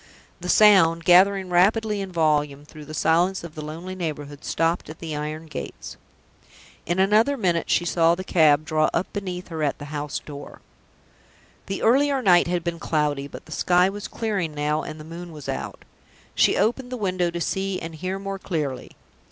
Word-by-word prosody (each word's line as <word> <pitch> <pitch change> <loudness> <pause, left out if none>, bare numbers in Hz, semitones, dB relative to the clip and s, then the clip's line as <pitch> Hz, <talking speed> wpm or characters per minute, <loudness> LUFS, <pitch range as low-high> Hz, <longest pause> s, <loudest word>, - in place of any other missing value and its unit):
The 180 0 -6
sound, 170 -7 +5
gathering 190 +1 +5
rapidly 210 +3 +2
in 195 -1 -6
volume 150 -4 0
through 150 0 -12
the 155 - -9
silence 175 +5 +2
of 170 -2 -8
the 155 - -7
lonely 165 +5 -7
neighborhood, 145 -5 -5
stopped 165 +1 -1
at 155 - -9
the 160 -2 -5
iron 155 +2 -5
gates. 155 -4 -7 0.9
In 175 +2 0
another 215 +9 +3
minute 175 -7 0
she 175 - +2
saw 170 -1 +3
the 185 - -6
cab 155 -4 +3
draw 155 0 +2
up - - +1
beneath 185 -3 -5
her, 160 -2 -5
at 145 -2 0
the 145 - -8
house 145 -1 -3
door. 145 -1 -10 1.1
The 195 - -4
earlier 275 +4 +3
night 175 -4 +5
had 175 -1 -1
been 170 -1 -3
cloudy, 150 -4 -1
but - - -11
the 155 - -15
sky 180 +3 +3
was 205 +1 -6
clearing 195 -9 -3
now 150 +1 0
and 155 - -8
the - - -9
moon 170 +2 -9
was 150 -3 -10
out. - - -5 0.5
She - - +3
opened 245 +3 0
the 250 - -3
window 185 -4 0
to 170 0 -5
see 190 +2 -2
and 165 0 -7
hear 185 +4 -4
more 195 0 -5
clearly. 145 -9 -4
170 Hz, 185 wpm, -24 LUFS, 155-190 Hz, 1.1 s, sound